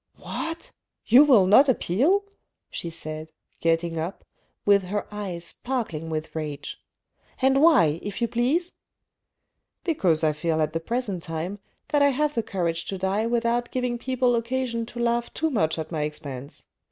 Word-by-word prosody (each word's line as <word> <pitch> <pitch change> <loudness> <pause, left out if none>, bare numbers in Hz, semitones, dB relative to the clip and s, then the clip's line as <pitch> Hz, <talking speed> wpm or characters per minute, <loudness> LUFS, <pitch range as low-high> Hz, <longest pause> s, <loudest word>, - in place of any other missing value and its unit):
" - - -48
What! 330 0 -6 0.3
you 250 +6 +8
will 250 -10 +6
not 260 +9 +6
appeal," 270 - +2 0.5
she 170 - -5
said, 155 -1 -6 0.3
getting 165 0 0
up, 170 +5 -5 0.4
with 200 -1 +5
her 205 +3 -2
eyes 185 -5 -4
sparkling 190 -10 -3
with 155 0 -4
rage. 150 -2 -5 0.3
" - - -35
And 270 +1 +4
why, 235 - +5
if 205 +1 -5
you 235 - +1
please? 275 +10 0 0.3
" - - -58
" - - -55
Because 185 - +1
I 155 -1 +3
feel 160 +1 -1
at 155 0 0
the 165 - 0
present 205 0 -2
time 165 +5 -4 0.3
that 290 -1 +2
I 285 - +6
have 295 +2 0
the 230 - 0
courage 170 -5 -2
to 195 - -4
die 195 +4 0
without 235 0 0
giving 250 -2 -2
people 255 -1 +1
occasion 235 -1 -2
to 240 - -11
laugh 235 0 0
too 320 0 0
much 160 - +1
at 160 0 -5
my 155 -3 -2
expense. 145 -2 -6
205 Hz, 175 wpm, -25 LUFS, 165-250 Hz, 0.5 s, you